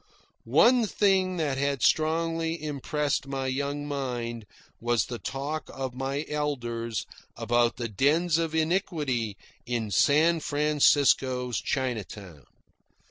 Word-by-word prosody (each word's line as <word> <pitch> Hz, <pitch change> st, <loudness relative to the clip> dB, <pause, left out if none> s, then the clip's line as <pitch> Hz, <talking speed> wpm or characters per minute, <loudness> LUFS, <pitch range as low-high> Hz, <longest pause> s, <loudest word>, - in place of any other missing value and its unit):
One 240 Hz, -2 st, +4 dB
thing 190 Hz, -2 st, +2 dB
that 145 Hz, -5 st, -1 dB
had 140 Hz, -2 st, 0 dB
strongly 165 Hz, +1 st, +1 dB
impressed 150 Hz, -1 st, -2 dB
my 135 Hz, -1 st, -3 dB
young 140 Hz, +2 st, -2 dB
mind 120 Hz, -5 st, -4 dB, 0.3 s
was 120 Hz, -2 st, +1 dB
the 120 Hz, -1 st, -6 dB
talk 145 Hz, +4 st, -4 dB
of 130 Hz, -2 st, -5 dB
my 135 Hz, +3 st, -3 dB
elders 120 Hz, -6 st, -3 dB, 0.3 s
about 120 Hz, 0 st, +1 dB
the 120 Hz, -1 st, -3 dB
dens 155 Hz, -, +2 dB
of 165 Hz, -1 st, -2 dB
iniquity 155 Hz, -, -1 dB, 0.3 s
in 115 Hz, -3 st, -2 dB
San 160 Hz, +8 st, +4 dB
Francisco's 145 Hz, -5 st, +2 dB
Chinatown. 105 Hz, -, -4 dB
140 Hz, 110 wpm, -27 LUFS, 120-155 Hz, 0.3 s, One